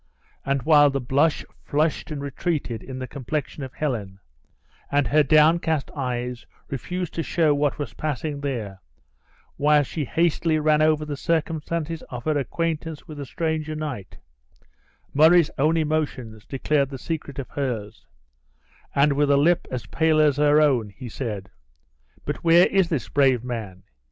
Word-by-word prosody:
And 140 -2 -1
while 145 -2 +6
the 135 0 -1
blood 140 +5 +2 0.3
flushed 150 +1 0
and 145 -2 -5
retreated 140 -5 -3
in 130 -1 -8
the 130 - -4
complexion 140 +2 -4
of 130 -2 -7
Helen, 110 -10 -3 0.7
and 145 -1 +2
her 150 +1 +5
downcast 155 +1 +3
eyes 125 -3 -3 0.2
refused 175 +7 -4
to 165 - -2
show 160 -2 +2
what 145 0 0
was 145 - -5
passing 150 -1 -3
there, 115 -9 -4 0.8
while 150 0 +4
she 150 +2 -4
hastily 165 +1 +1
ran 155 0 +3
over 155 -1 +3
the 150 -1 -4
circumstances 165 +1 -2
of 125 -1 -6
her 155 -1 0
acquaintance 160 +2 -3
with 155 -3 -9
the 140 - -6
stranger 155 0 -2
knight, 145 -11 -6 1.0
Murray's 160 +2 +5
own 155 +4 +3
emotions 145 -9 -2
declared 140 0 0
the 135 - -6
secret 145 -1 -5
of 140 - -5
hers; 120 -7 -4 0.9
and 140 +1 +4
with 145 0 +1
a 140 - +5
lip 165 +5 +3
as 125 -5 -4
pale 155 +8 +2
as 150 -2 +4
her 150 0 +4
own, 130 -8 +2
he 120 +4 -9
said, 105 -5 -5 0.7
"But - - -2
where 170 +1 +5
is 190 -3 +2
this 150 -8 -2
brave 135 -4 +2
man? 110 -7 -6
145 Hz, 155 wpm, -24 LUFS, 130-155 Hz, 1.0 s, while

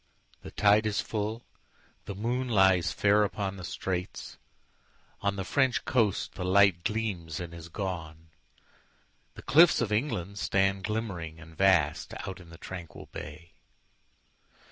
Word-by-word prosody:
The - - -9
tide 105 +1 +4
is 105 - 0
full, 110 +2 -3 0.6
the 100 - -6
moon 120 +5 -2
lies 95 -5 +4
fairUpon 100 -1 +1
the 90 - -8
straits;—on 95 +2 -6
the 95 - -3
French 130 +5 +1
coast 115 -10 +1
the 90 - -5
lightGleams 95 -2 +1
and 85 -1 -6
is 85 0 -10
gone; 80 -4 -5 1.0
the - - -11
cliffs 170 +3 +6
of 115 -3 -1
England 100 - -1
stand, 95 -1 +1
Glimmering 90 -8 -4
and 80 0 -13
vast, 85 -5 +2
out 95 -1 -6
in 85 -2 -14
the 85 - -12
tranquil 90 -2 -9
bay. 75 +3 -9
95 Hz, 125 wpm, -29 LUFS, 85-105 Hz, 1.0 s, cliffs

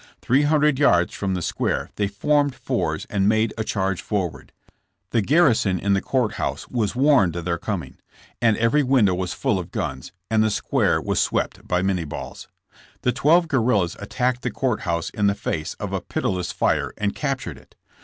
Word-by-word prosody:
Three 130 +4 +2
hundred 150 -2 +3
yards 90 -12 +3
from 95 -2 -2
the 90 - -3
square - - -2
they 100 - 0
formed 145 +7 +1
fours - - -2
and 100 0 +1
made 110 +1 +2
a 110 - -2
charge 95 -3 -1
forward. 95 -6 -3 0.6
The 115 - +2
garrison 120 - +3
in 100 +3 +1
the 95 - +2
court 125 -6 0
house - - -3
was 115 -4 -1
warned 130 - +4
of 85 -1 -4
their 85 -1 -1
coming, - - -5 0.4
and 115 -3 +3
every 115 +6 +3
window 125 -8 +3
was 90 0 -2
full - - 0
of - - -6
guns, 65 -1 -4 0.2
and 110 -1 +2
the 110 - +2
square - - +1
was - - -1
swept - - -1
by 90 0 +1
minnie 95 -3 0
balls. 75 - -8 0.6
The 125 - +3
twelve 160 +7 +3
guerrillas 115 - +1
at 100 - -9
tacked 125 -1 0
the - - -1
court 125 -5 -1
house 85 -3 -2
in 105 -1 +1
the 100 - +2
face 80 -5 -3
of - - -5
a - - -1
pitiless 90 -2 -2
fire - - 0
and 105 -1 -1
captured 135 -3 -3
it. - - -23
110 Hz, 195 wpm, -23 LUFS, 95-130 Hz, 0.6 s, warned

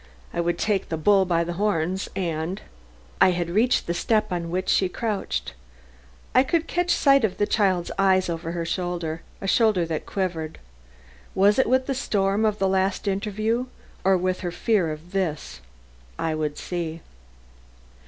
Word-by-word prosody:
I 170 - 0
would 170 0 0
take 210 -3 0
the 160 - -2
bull 195 +4 +4
by 170 -2 +1
the 175 +1 -4
horns 190 -2 0
and 170 0 -2 0.6
I 190 - +8
had 175 -1 -1
reached 230 +7 +2
the 170 - -1
step 215 +4 +1
on 170 -2 -2
which 185 +2 -2
she 190 - +3
crouched. 195 - -3 0.8
I - - +6
could 325 +4 +1
catch 355 0 -1
sight 275 -5 +4
of 210 -4 0
the 205 - +2
child's 190 -5 +1
eyes 190 -1 +4
over 165 -1 -4
her 170 -1 -3
shoulder, 170 -2 -3 0.2
a 195 - -4
shoulder 210 -5 +3
that 160 -1 -4
quivered 170 -5 -3 0.8
was 200 +5 +4
it 265 - +3
with 260 +1 +3
the 275 - -1
storm 205 -5 +1
of 210 -1 +1
the 195 - +1
last 190 +1 0
interview, 215 +5 -1 0.4
or 190 0 +4
with 185 +1 -1
her 180 - -3
fear 190 -4 +1
of 155 +3 -9
this? 175 - -3 0.6
I 160 - -1
would 150 -1 -2
see. 170 -2 -4
185 Hz, 170 wpm, -24 LUFS, 170-210 Hz, 0.8 s, I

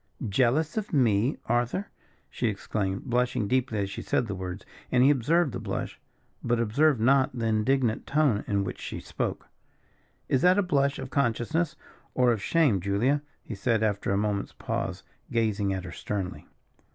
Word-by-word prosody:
"Jealous 130 - +1
of 215 -1 -2
me, 120 -2 +2
Arthur?" 120 +12 -1 0.4
she 120 - -2
exclaimed, 100 -2 -2
blushing 125 -4 0
deeply 125 -1 0
as 100 -1 0
she - - -5
said 125 - 0
the 100 - -4
words; 90 -1 -6 0.3
and 125 0 +4
he 140 - +7
observed 145 +4 +2
the - - -4
blush, - - -4 0.4
but 120 0 +1
observed 125 +5 +3
not 130 +2 +3
the 115 - -1
indignant 115 +2 +1
tone 145 -8 +2
in 100 -1 +1
which - - -6
she - - -5
spoke. - - -4 0.8
"Is 130 - +2
that 180 +2 +5
a 205 - +3
blush 140 -6 +1
of 130 - -7
consciousness, 140 +6 0 0.4
or 125 -1 +4
of 110 -4 -1
shame, 140 - +2
Julia?" 110 +10 +1 0.2
he - - -7
said, 110 +2 0
after 105 -2 0
a 100 - +2
moment's 105 -1 -1
pause, - - -4 0.3
gazing 110 -4 +1
at 95 -1 -3
her - - -7
sternly. 95 -3 -4
120 Hz, 170 wpm, -27 LUFS, 105-140 Hz, 0.8 s, he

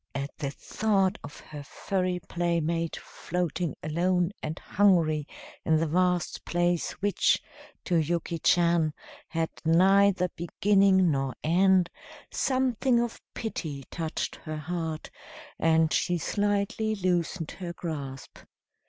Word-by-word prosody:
At 140 +1 -4
the 140 -3 -2
thought 195 +5 0
of 145 - -10
her 150 -1 -9
furry 185 +4 -2
playmate 170 -1 0
floating 175 -1 -3
alone 175 +3 +1
and 155 +1 -4
hungry 165 -7 +2 0.4
in 160 -1 +3
the 165 - +1
vast 180 +2 0
place 175 0 0
which, 205 -1 +3 0.5
to 175 - +2
Yuki 170 +1 -1
Chan, 170 -2 +3 0.3
had 165 -1 -2
neither 185 +2 +4
beginning 190 +1 +3
nor 135 -2 -1
end, 180 +2 +4 0.4
something 260 -2 +1
of 235 -1 -2
pity 155 -11 -4
touched 160 -2 -3
her 155 0 -6
heart, 160 0 -4 0.5
and 160 -1 +3
she 175 -1 +1
slightly 205 +4 0
loosened 180 -3 -1
her 175 -2 -4
grasp. 140 -6 -6
175 Hz, 115 wpm, -28 LUFS, 160-190 Hz, 0.5 s, neither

